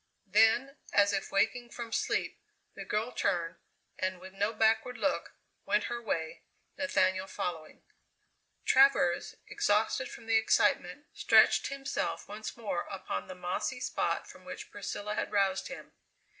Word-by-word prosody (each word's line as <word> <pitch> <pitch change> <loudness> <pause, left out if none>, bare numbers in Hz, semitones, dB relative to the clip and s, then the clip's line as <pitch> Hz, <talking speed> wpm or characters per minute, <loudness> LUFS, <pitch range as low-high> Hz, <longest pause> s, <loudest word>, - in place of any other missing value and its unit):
Then, 225 +7 +3
as 205 0 +4
if 195 - -2
waking 240 +4 +1
from 235 -1 -7
sleep, - - -1 0.3
the - - -8
girl 215 +4 -1
turned, 175 -7 -1 0.4
and 185 -1 -1
with 190 +1 -11
no 205 +2 0
backward 225 +2 +2
look, 280 +5 -1 0.3
went 210 +1 +1
her 240 - -4
way, 160 -8 -3 0.3
Nathaniel 190 -9 +1
following. 165 -5 -5 0.8
Travers, 265 -10 +4
exhausted 215 +5 +1
from 230 - -11
the 225 0 +4
excitement, 220 - +2
stretched - - +5
himself 275 0 -3
once 215 +3 -7
more 210 -6 -3
upon 190 -1 -4
the 185 - -8
mossy 180 +8 -3
spot - - -1
from - - -14
which - - -8
Priscilla 210 +1 -4
had - - -2
roused 195 -1 +1
him. 270 - -9
210 Hz, 140 wpm, -31 LUFS, 190-235 Hz, 0.8 s, stretched